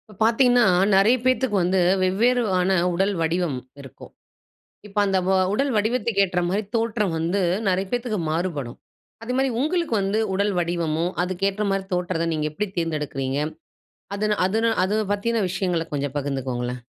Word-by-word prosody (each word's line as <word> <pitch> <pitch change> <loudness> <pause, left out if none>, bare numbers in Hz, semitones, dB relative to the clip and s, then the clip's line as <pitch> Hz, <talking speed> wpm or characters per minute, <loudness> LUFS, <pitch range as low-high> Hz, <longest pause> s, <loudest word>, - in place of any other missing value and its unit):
இப்போ - - -13
பார்த்தீங்கன்னா, 245 +1 +4 0.3
நிறைய 205 +6 +5
பேத்துக்கு 255 -3 +2
வந்து, 185 +2 +1 0.2
வெவ்வேறான 195 -1 +2 0.2
உடல் 195 +4 +1
வடிவம் 165 -3 0 0.2
இருக்கும், 135 -4 -13 0.8
இப்ப 210 0 -6
அந்த 195 -1 +2
வ - - +3 0.2
உடல் 275 +7 +1
வடிவத்துக்கு 220 -1 +1
ஏற்ற 180 -1 -1
மாரி 200 +4 0
தோற்றம் 225 -4 0
வந்து, 175 +5 0 0.3
நிறைய 190 +1 +1
பேத்துக்கு 240 -3 -1
மாறுபடும், 155 -7 -3 0.5
அதுமாரி 260 +3 0
உங்களுக்கு 335 -2 0
வந்து 195 +2 0 0.2
உடல் 200 +2 +1
வடிவமும், 170 0 -1
அதுக்கு 185 +1 -2
ஏற்ற 210 +2 -3
மாரி 195 0 -1
தோற்றத்த 180 -2 -1
நீங்க 155 -1 -1
எப்படி 210 +6 -3
தேர்ந்தெடுக்கறீங்க? 150 -5 -2 0.8
அது 210 +1 +1
அது 210 +4 0 0.2
அத 210 +3 0
பத்தின 225 +2 0
விஷயங்கள 180 -2 -1
கொஞ்சம் 140 -1 -2
பகிர்ந்துக்கோங்களேன். 125 -3 -3
190 Hz, 140 wpm, -23 LUFS, 165-215 Hz, 0.8 s, நிறைய